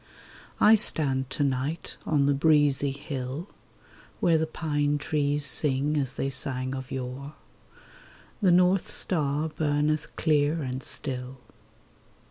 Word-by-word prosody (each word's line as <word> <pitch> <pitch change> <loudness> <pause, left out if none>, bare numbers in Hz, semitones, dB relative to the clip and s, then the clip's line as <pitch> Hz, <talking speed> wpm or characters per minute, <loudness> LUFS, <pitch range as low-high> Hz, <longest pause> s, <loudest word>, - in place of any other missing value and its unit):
I 215 - +7
stand 135 -10 +2
to 145 - -1
night 140 +4 -2
on 145 -3 +2
the 140 - +3
breezy 145 -1 +3
hill, 140 +3 -6 0.7
Where 165 -2 +3
the 160 - -1
pine 145 -2 -1
trees 145 0 0
sing 140 +1 +1
as 135 -2 -1
they 135 - -2
sang 130 0 0
of 130 -1 -6
yore; 135 +3 -6 1.1
The 195 - +4
north 180 +1 +3
star 150 -3 -1
burneth 150 0 -1
clear 150 0 +1
and 130 0 -4
still. 130 -2 -4
145 Hz, 120 wpm, -27 LUFS, 135-155 Hz, 1.1 s, I